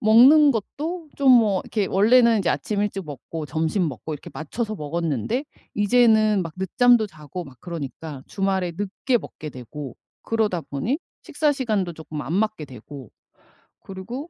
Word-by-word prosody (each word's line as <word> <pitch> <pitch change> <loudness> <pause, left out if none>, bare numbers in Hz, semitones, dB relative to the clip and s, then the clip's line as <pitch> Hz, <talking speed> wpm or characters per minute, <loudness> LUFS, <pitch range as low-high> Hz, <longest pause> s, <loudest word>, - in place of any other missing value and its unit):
먹는 265 +7 +7
것도 310 - -4
좀 270 -2 +5
뭐 215 -6 +4
이렇게 210 -3 -1
원래는 230 +2 +5
아침 200 +8 0
일찍 195 -3 -2
먹고 150 +2 -7
점심 160 +5 0
먹고 140 +4 -6
이렇게 145 - -10
맞춰서 215 +8 -4
먹었는데 165 - -2 0.3
이제는 215 -1 +4
막 165 -2 -6
늦잠도 220 +4 +3
자고 155 0 -8
막 135 -4 -14
그러니까 155 -4 -7
주말에 190 -3 -1
늦게 205 +5 0
먹게 155 - -9
되고 130 +1 -8 0.3
그러다 215 -6 0
보니 220 - -2 0.2
식사 305 -2 0
시간도 215 -10 -1
쪼끔 155 -1 -7
안 160 - -4
맞게 215 -7 0
되고 130 0 -11 0.7
그리고 235 - -7
195 Hz, 315 characters per minute, -23 LUFS, 155-230 Hz, 0.7 s, 먹는